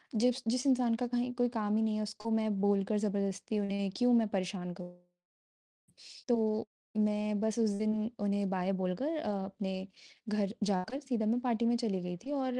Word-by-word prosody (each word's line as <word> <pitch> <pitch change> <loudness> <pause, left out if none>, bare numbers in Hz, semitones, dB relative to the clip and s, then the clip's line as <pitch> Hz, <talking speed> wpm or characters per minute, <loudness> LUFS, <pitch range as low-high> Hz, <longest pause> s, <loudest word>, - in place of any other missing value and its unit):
जिस 245 +3 +3
जिस 245 +3 +1
इंसान 245 -3 +4
का 245 +1 -1
कहीं 245 +1 -1
कोई 245 -1 +2
काम 210 0 +1
ही 220 - +3
नहीं 220 -1 +1
है 215 - 0
उसको 210 +2 -5
मैं 220 -1 +2
बोलकर 205 +1 +2
जबरदस्ती 200 0 -1
उन्हें 200 -1 -1
क्यों 245 0 +4
मैं 225 -2 +5
परेशान 185 -2 -2
करूँ। 180 0 -11 1.3
तो 220 -2 +2 0.3
मैं 210 -1 +1
बस 220 0 0
उस 220 -2 +4
दिन 215 0 +1
उन्हें 200 -1 +1
बाय 190 0 0
बोलकर 265 - -1
अ, 305 - -2 0.2
अपने 195 -1 -4 0.4
घर 210 -1 0
जाकर 200 +7 0
सीधा 245 -6 -1
मैं 235 +3 +2
पार्टी 235 -2 +1
में 235 +1 +4
चली 205 -6 -1
गई 180 0 -4
थी 285 - -5
और 255 -1 -1
215 Hz, 185 wpm, -33 LUFS, 200-235 Hz, 1.3 s, मैं